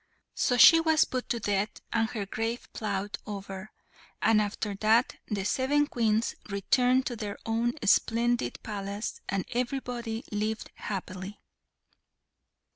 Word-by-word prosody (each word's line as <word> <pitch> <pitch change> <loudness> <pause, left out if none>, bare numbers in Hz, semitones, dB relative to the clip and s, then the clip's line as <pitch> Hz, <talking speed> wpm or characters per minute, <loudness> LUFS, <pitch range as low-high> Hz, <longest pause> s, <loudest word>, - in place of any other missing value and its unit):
So 245 - +1
she 330 +6 +9
was 320 -1 +4
put 255 -1 -4
to 235 - 0
death, 205 0 0 0.2
and 225 -1 +2
her 215 -5 -3
grave 225 +4 -3
ploughed 205 -1 -3
over, 195 0 -6 0.5
and 220 -1 +4
after 205 0 -2
that 220 +4 +3
the 200 -3 -2
seven 275 +7 +2
Queens 225 -5 +1 0.2
returned 250 +6 +2
to 245 - -2
their 210 -2 -5
own 230 +2 +1
splendid 230 - +2
palace, 205 0 -4
and 195 -1 -1
everybody 245 -2 -3
lived 215 +1 -2
happily. 190 0 -6
220 Hz, 125 wpm, -29 LUFS, 205-240 Hz, 0.5 s, she